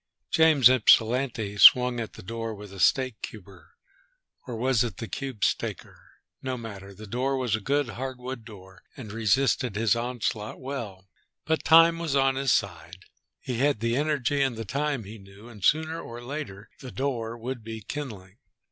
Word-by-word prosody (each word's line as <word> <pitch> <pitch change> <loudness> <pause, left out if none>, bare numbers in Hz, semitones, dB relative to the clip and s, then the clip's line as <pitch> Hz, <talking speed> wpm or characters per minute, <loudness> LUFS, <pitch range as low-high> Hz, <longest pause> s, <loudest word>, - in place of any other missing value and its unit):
James 155 -6 +6
Ypsilanti 115 -3 +3
swung 125 +1 +7
at 115 - -5
the - - -12
door 115 +2 -5
with 105 -1 -11
the 100 - -10
steak 130 +1 +2
cuber. 95 -6 -11 0.7
Or 125 - -5
was 125 +1 +1
it 110 -7 -5
the 115 - -6
cube 130 0 -6
steaker? - - -4 0.2
No 130 -1 -3
matter. 100 -4 -9
The 110 +3 -10
door 130 +6 -1
was 125 -5 0
a - - -3
good, 140 +4 0
hardwood 130 0 -6
door 95 -4 -14 0.2
and 115 -6 -8
resisted 115 +1 +1
his 110 +1 +2
onslaught 115 -3 -3
well. 115 -9 -7 0.4
But 160 +1 0
time 165 +1 +6
was 160 -4 -2
on 135 -1 +3
his 135 -1 0
side. 95 -2 -2 0.4
He 125 -3 -4
had 140 -3 +2
the 115 +1 0
energy 145 -1 0
and 135 -3 +1
the 115 - -5
time, 140 +3 -2
he 105 +2 -10
knew, 100 +3 -15
and 105 -5 -13
sooner 160 - +1
or 120 +1 -9
later 120 -7 -7
the 130 - -9
door 120 -4 -3
would 120 0 -6
be 110 0 -7
kindling. 105 -6 -8
120 Hz, 175 wpm, -26 LUFS, 105-135 Hz, 0.7 s, swung